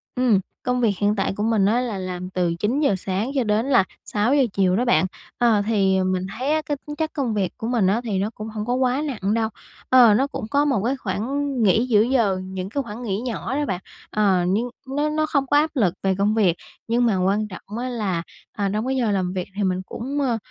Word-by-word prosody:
Ừm, 250 -6 +3 0.2
công 250 0 0
việc 220 -4 +3
hiện 205 +2 +1
tại 195 - 0
của 205 - -2
mình 220 -3 +2
á, 220 +5 +3
là 235 -5 -3
làm 185 -1 -5
từ 180 -2 0
9:00 250 - +1
sáng 195 +7 -2
cho 265 - +2
đến 215 +1 +1
là 250 -8 +5 0.2
6:00 245 +7 +2
chiều 185 -2 +2
đó 240 +5 +1
bạn. 240 -5 +3 0.3
Ờ, 230 -4 +3
thì 195 -4 +2
mình 185 0 0
thấy 265 +4 -1
á, 310 - +1
cái 290 - -2
tính 295 - -5
chất 315 0 -2
công 265 -7 -1
việc 195 -4 0
của 225 - -4
mình 235 -6 +2
á, 210 +5 +2
thì 210 -5 -1
nó 200 +2 0
cũng 215 - -6
hổng 215 -1 -4
có 245 - 0
quá 255 +2 +1
nặng 210 -7 -1
đâu. 225 -1 +1 0.4
Ờ, 245 -4 +7
nó 265 +7 +2
cũng 280 - -5
có 285 +1 +3
một 265 -9 +1
cái 260 +3 +1
khoảng 265 +7 -2
nghỉ 220 +4 +4
giữa 215 -4 +4
giờ, 225 -5 +2
những 185 0 -5
cái 280 +6 -2
khoảng 230 0 -8
nghỉ 205 -2 -2
nhỏ 250 +2 -3
đó 295 +1 0
bạn. 185 -7 -2 0.3
Ờ, 195 -4 +2
nhưng 215 +7 0 0.2
nó 290 +3 0
nó 310 0 +1
không 280 -3 0
có 290 - +3
áp 305 +2 +3
lực 210 - +2
về 190 -1 +2
công 205 +2 +2
việc, 190 -7 +3 0.3
nhưng 240 +2 +2
mà 220 -5 +2
quan 205 +3 +1
trọng 205 +2 -9
á 250 +2 -3
là, 200 -8 -2 0.3
ờ, 205 - 0
trong 215 +2 -1
cái 265 - 0
giờ 235 -4 +1
làm 185 -2 0
việc 185 -2 -3
thì 205 - 0
mình 185 -1 0
cũng, 270 +9 -4
ơ, 245 -4 +1
220 Hz, 250 wpm, -23 LUFS, 195-255 Hz, 0.4 s, Ờ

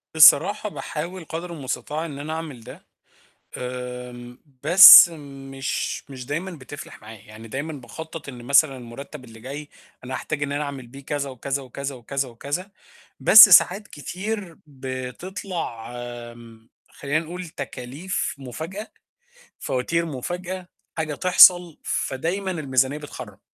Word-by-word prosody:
صراحة 200 +7 +6
باحاول 170 +1 -6
قدر 170 +2 -6
المستطاع 150 +2 -4
إن 145 -3 -8
أنا 155 +2 -5
أعمل 160 -7 -7
ده، - - -13 0.7
آمم، 125 -1 -7 0.2
بس 180 -1 +11
مش 135 -2 -5
مش 130 -2 -9
دايمًا 165 +7 -4
بتفلَح 145 -7 -11
معايا. 110 0 -11
يعني 110 +1 -12
دايمًا 140 +7 -5
باخطَّط 155 +3 -9
إن 120 -3 -9
مثلًا 140 +1 +4
المُرتَّب 130 +3 -10
اللي 115 -1 -14
جاي 145 +4 -8 0.4
أنا 130 - -6
هاحتاج 150 +1 -4
إن 140 -1 -2
أنا 145 +1 -2
أعمل 140 -3 -7
بيه 135 +3 -13
كذا 140 -2 -3
وكذا 135 +2 -4
وكذا 140 +2 -6
وكذا 135 +2 -4
وكذا، 145 - -5 0.5
بس 210 -1 +10
ساعات 190 +3 +5
كتير 185 +3 -6
بتطلع 130 - -6 1.0
خلّينا 145 +2 -2
نقول 175 +2 -7
تكاليف 140 +6 -5
مُفاجأة، 160 - -7 0.7
فواتير 165 +7 -2
مُفاجأة، 175 +6 -6 0.3
حاجة 155 -2 -2
تحصل، 180 -1 +6
فدايمًا 180 +8 -3
الميزانية 140 -3 0
بتخرَّب. 150 - -10
145 Hz, 125 wpm, -23 LUFS, 130-170 Hz, 1.0 s, بس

